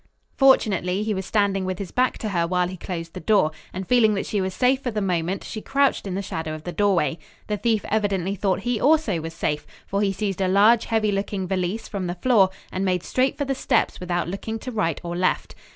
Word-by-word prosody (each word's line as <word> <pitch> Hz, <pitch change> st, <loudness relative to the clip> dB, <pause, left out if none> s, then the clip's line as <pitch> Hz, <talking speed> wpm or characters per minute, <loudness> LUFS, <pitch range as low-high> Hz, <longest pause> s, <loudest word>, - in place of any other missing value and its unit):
Fortunately 205 Hz, -8 st, +3 dB
he 215 Hz, 0 st, -1 dB
was 190 Hz, -1 st, -4 dB
standing 200 Hz, -3 st, +1 dB
with 185 Hz, -1 st, -2 dB
his 195 Hz, -2 st, -6 dB
back 255 Hz, +1 st, +1 dB
to 215 Hz, -, -4 dB
her 170 Hz, -4 st, 0 dB
while 180 Hz, 0 st, +1 dB
he 185 Hz, -, -6 dB
closed 165 Hz, -2 st, -6 dB
the -, -, -6 dB
door, 190 Hz, -3 st, +3 dB, 0.2 s
and 185 Hz, 0 st, -6 dB
feeling 225 Hz, -4 st, +4 dB
that 195 Hz, -, -2 dB
she 205 Hz, -, -1 dB
was 190 Hz, 0 st, -1 dB
safe 255 Hz, +6 st, +2 dB
for 255 Hz, -, -2 dB
the 215 Hz, -2 st, -2 dB
moment, 185 Hz, -1 st, -1 dB
she 215 Hz, -, -6 dB
crouched 275 Hz, -4 st, +1 dB
in 185 Hz, -, -3 dB
the 200 Hz, -, -2 dB
shadow 160 Hz, -4 st, -4 dB
of 155 Hz, -, -10 dB
the 175 Hz, -, -4 dB
doorway. 175 Hz, -7 st, +1 dB, 0.3 s
The 210 Hz, -, -2 dB
thief 220 Hz, 0 st, 0 dB
evidently 200 Hz, -3 st, 0 dB
thought 195 Hz, 0 st, 0 dB
he 240 Hz, 0 st, -1 dB
also 280 Hz, -, +3 dB
was 165 Hz, +1 st, -7 dB
safe, 150 Hz, -2 st, -2 dB, 0.2 s
for 200 Hz, +1 st, -1 dB
he 200 Hz, -1 st, +2 dB
seized 195 Hz, -1 st, -3 dB
a 190 Hz, -, +2 dB
large, 210 Hz, +5 st, +5 dB
heavy 220 Hz, -2 st, +1 dB
looking 195 Hz, -1 st, -2 dB
valise 190 Hz, +4 st, -2 dB
from 195 Hz, -4 st, -4 dB
the 175 Hz, -, -3 dB
floor 200 Hz, -1 st, +4 dB, 0.2 s
and 190 Hz, -, -2 dB
made 180 Hz, -2 st, 0 dB
straight 260 Hz, +1 st, 0 dB
for 285 Hz, -, -1 dB
the 270 Hz, -, 0 dB
steps 265 Hz, -, 0 dB
without 175 Hz, -1 st, -2 dB
looking 200 Hz, +5 st, -4 dB
to 255 Hz, -, -5 dB
right 190 Hz, -9 st, -1 dB
or 170 Hz, 0 st, -4 dB
left. 185 Hz, +1 st, 0 dB
195 Hz, 235 wpm, -24 LUFS, 180-220 Hz, 0.3 s, large